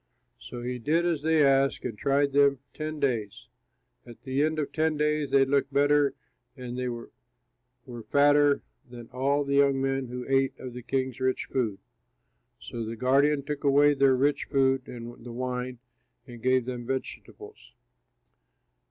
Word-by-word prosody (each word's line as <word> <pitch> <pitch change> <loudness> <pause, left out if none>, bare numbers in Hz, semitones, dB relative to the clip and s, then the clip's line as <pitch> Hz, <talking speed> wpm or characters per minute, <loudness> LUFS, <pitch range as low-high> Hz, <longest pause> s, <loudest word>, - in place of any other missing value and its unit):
So 120 -1 -8
he 125 0 -4
did 160 +8 +1
as 165 -4 0
they 160 0 +3
asked 135 0 +2
and 120 -4 -4
tried 140 +5 +1
them 140 0 +4 0.2
ten 155 0 -5
days. 125 -2 -2 0.5
At 120 -2 -14
the 135 +1 -1
end 155 +1 +1
of 150 -2 -2
ten 160 -1 0
days 150 -1 0
they 135 0 +4
looked 140 +1 0
better 145 0 +3 0.4
and 125 -1 -7
they 125 0 -3
were 120 -1 -7 1.0
fatter 145 0 +4 0.3
than 120 -1 -11
all 140 +3 0
the 140 0 0
young 140 -1 +3
men 135 -1 -1
who 125 +1 -6
ate 135 0 +1
of 125 -2 -8
the 125 - -7
king's 130 0 -2
rich 130 0 -1
food. 115 -7 -2 0.8
So 115 -1 -6
the 115 +1 -5
guardian 140 +4 +2
took 150 0 -5
away 145 +1 +5
their 135 -2 +3
rich 140 +2 +1
food 135 -2 +1
and 120 -1 -9
the 120 - -8
wine 125 +1 -4 0.5
and 120 -2 -12
gave 130 0 +2
them 120 -2 -6
vegetables. 420 - -7
135 Hz, 160 wpm, -27 LUFS, 125-145 Hz, 1.0 s, away